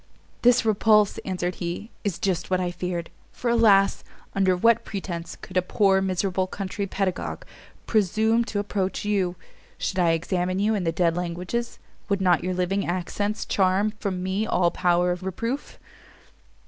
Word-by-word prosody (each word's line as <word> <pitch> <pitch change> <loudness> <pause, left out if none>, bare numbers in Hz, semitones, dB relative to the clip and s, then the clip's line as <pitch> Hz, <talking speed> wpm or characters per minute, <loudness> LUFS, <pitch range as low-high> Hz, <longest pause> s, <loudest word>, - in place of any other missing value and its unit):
"This 245 0 +4
repulse," 210 -1 +3
answered 180 -1 -2
he, 175 +6 -4
"is 200 -6 -1
just 185 -4 -1
what 185 -1 +2
I 180 -1 -1
feared; 175 -1 -4 0.2
for 240 - -2
alas! 205 -4 +4 0.3
under 190 -2 +2
what 230 +5 +4
pretence 175 -4 -5
could 185 - -7
a - - +5
poor 190 +1 +2
miserable 185 0 0
country 195 +1 -4
pedagogue 190 -1 -2 0.4
presume 220 +2 +2
to 210 - -4
approach 205 -1 -2
you? 190 -4 0 0.4
Should 190 - -2
I 170 -2 +4
examine 180 +2 -1
you 210 +3 +2
in 195 -4 -1
the 165 - +2
dead 165 0 +1
languages, 180 +7 -3 0.3
would 200 -1 +1
not 180 -3 +3
your 185 0 -1
living 185 +2 0
accents 205 +4 -2
charm 195 +2 +2
from 185 -4 -2
me 195 +4 -1
all 175 -1 +2
power 175 0 +2
of 180 0 -3
reproof? 230 +9 -4
190 Hz, 160 wpm, -25 LUFS, 180-205 Hz, 0.4 s, a